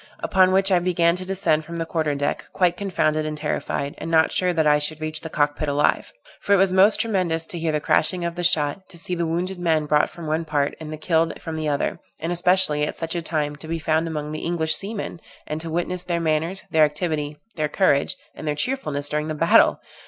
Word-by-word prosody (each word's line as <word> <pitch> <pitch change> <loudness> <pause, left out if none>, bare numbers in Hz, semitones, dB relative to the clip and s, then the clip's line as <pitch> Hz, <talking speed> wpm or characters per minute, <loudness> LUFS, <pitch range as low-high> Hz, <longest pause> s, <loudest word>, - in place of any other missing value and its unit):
Upon 185 -1 +3
which 195 +1 +3
I 180 - +5
began 170 -1 +2
to 185 - -4
descend 170 -5 +2
from 170 +2 -7
the 165 - -2
quarter 155 -3 -1
deck, 145 0 -2
quite 180 -2 +2
confounded 155 -6 0
and 155 0 -4
terrified, 150 -1 -2
and - - -5
not 160 -1 +4
sure 180 -1 +1
that 160 -3 +1
I 150 0 +5
should 150 +1 -3
reach 155 0 -4
the 160 - -6
cock 145 -1 +1
pit 155 -1 -2
alive; 145 +1 +1 0.3
for 200 - +2
it - - +6
was 190 -1 +3
most 195 +3 +5
tremendous 180 -7 0
to 170 - -4
hear 165 -1 0
the 150 - 0
crashing 175 +4 +1
of 170 - -2
the 175 +1 -4
shot, 165 +1 +1
to 175 - -12
see 170 +2 -3
the 170 -1 -1
wounded 180 +3 -2
men 160 -3 +1
brought 150 0 +2
from 170 - -10
one 155 +2 -1
part, 145 -3 -1
and 155 -1 -7
the 155 - -5
killed 165 +1 0
from 160 - -6
the 155 -1 -2
other; 145 -1 -1 0.2
and 165 +2 -3
especially, 175 -3 +2
at 150 - -2
such 165 -1 -4
a 170 - -2
time, 150 -2 -2
to 160 - -9
be 165 +1 -2
found 160 +1 0
among 150 -2 -4
the 155 - -4
English 160 -2 0
seamen! 200 -4 -4 0.2
and 155 +1 -4
to 165 - -6
witness 175 +2 -2
their 175 -1 -1
manners, 165 +3 -1
their 160 -1 +5
activity, 150 -1 -1 0.2
their 155 -2 -1
courage, 145 -5 +2 0.2
and - - -8
their 150 - 0
cheerfulness 150 - -2
during 150 +1 -1
the 155 - -3
battle! - - +4
160 Hz, 240 wpm, -23 LUFS, 150-175 Hz, 0.3 s, it